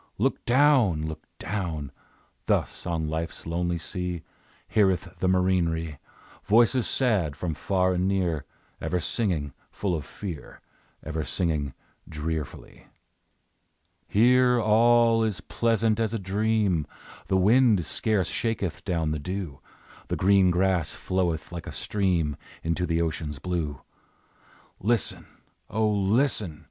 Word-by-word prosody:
Look - - 0
down! 120 - +4
Look 80 0 -5 0.2
down! 80 -7 -4 0.6
Thus - - 0
on 80 -2 -1
Life's 80 +1 -4
lonely 85 +1 -1
sea, 90 0 -4 0.4
Heareth 95 -5 +2
the 95 - +1
marinere 85 -5 +1 0.4
Voices 120 +3 +4
sad, 100 - +1
from 85 -3 -3
far 95 +3 +1
and 90 +1 0
near, 90 -7 0 0.4
Ever 90 - -1
singing 85 - -1 0.2
full 100 -3 -2
of 80 -3 -2
fear, 90 0 -8 0.4
Ever 80 0 -3
singing 75 -3 -1 0.3
drearfully. 80 0 -5 1.2
Here 125 +3 +4
all 115 +1 +4
is 105 -6 -1
pleasant 115 +3 +1
as 115 0 0
a - - -2
dream; 100 -4 +1 0.4
The 95 - +2
wind 105 -1 +4
scarce 105 +1 0
shaketh 105 -7 -2
down 85 -5 -1
the 75 - -2
dew, 90 -2 -5 0.5
The - - -1
green 95 -1 +4
grass 90 -2 +1
floweth 85 -4 -1
like 85 -1 -7
a - - -5
stream 90 -8 0 0.3
Into 85 +2 -1
the 85 0 +1
ocean's 80 -2 -3
blue; 80 -4 -3 1.0
Listen! 115 +1 0 0.4
O, 110 0 +1
listen! 105 - +1
90 Hz, 120 wpm, -26 LUFS, 80-105 Hz, 1.2 s, down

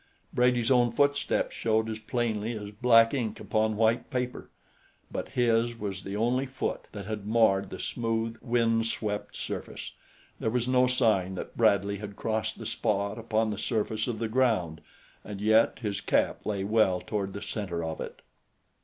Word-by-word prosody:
Brady's 125 0 +3
own 120 -2 +4
footsteps 140 +4 +1
showed 110 0 +1
as 110 0 -4
plainly 110 -1 -1
as 105 -1 -7
black 115 +1 +5
ink 120 -6 -2
upon 110 0 0
white 115 +1 +2
paper; 125 -2 -3 0.6
but - - -4
his 120 -2 +1
was 100 -4 -4
the 100 +2 -5
only 125 +5 +1
foot 130 0 -3
that 100 -2 -7
had 105 -1 -5
marred 110 -3 +3
the - - -7
smooth, 115 -1 -2
windswept 115 -3 0
surface - - -5 0.5
there - - 0
was 120 +1 0
no 130 0 +4
sign 110 -7 +2
that - - -7
Bradley 100 -3 +3
had 105 -1 -7
crossed 110 0 -2
the - - -8
spot 100 +1 -1
upon 110 -1 0
the 105 - -4
surface 110 -1 -1
of 120 -3 -2
the 115 +1 -2
ground, 110 -10 +1 0.4
and 100 -1 -7
yet 110 +2 +4
his 100 -2 -2
cap - - 0
lay 100 -2 -1
well 100 -3 +3
toward 100 -2 -3
the 100 - -6
center 90 -6 -3
of 80 -1 -4
it. - - -8
110 Hz, 165 wpm, -28 LUFS, 105-120 Hz, 0.6 s, black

